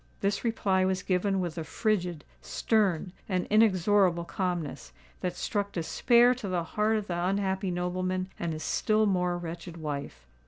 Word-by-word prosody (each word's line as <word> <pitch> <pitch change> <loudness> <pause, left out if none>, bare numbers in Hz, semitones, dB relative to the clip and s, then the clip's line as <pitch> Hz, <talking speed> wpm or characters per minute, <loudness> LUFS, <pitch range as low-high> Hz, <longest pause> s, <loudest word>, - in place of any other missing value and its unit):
This 200 0 0
reply 200 -5 +1
was 185 0 0
given 190 +1 +1
with 175 -2 -3
a - - -3
frigid—stern—and 185 0 -1
inexorable 195 -4 +4
calmness, 170 - -3 0.3
that 180 -1 -2
struck 200 +1 -2
despair 235 +8 +4
to 240 -5 -6
the 180 -2 0
heart 215 +6 +1
of 210 - -3
the 175 -2 -2
unhappy 190 0 0
nobleman 185 +1 -2
and 170 -1 -2
his 155 - -5
still 215 0 +2
more 180 -3 +1
wretched 170 0 -7
wife. 140 - -5
185 Hz, 145 wpm, -29 LUFS, 175-205 Hz, 0.3 s, inexorable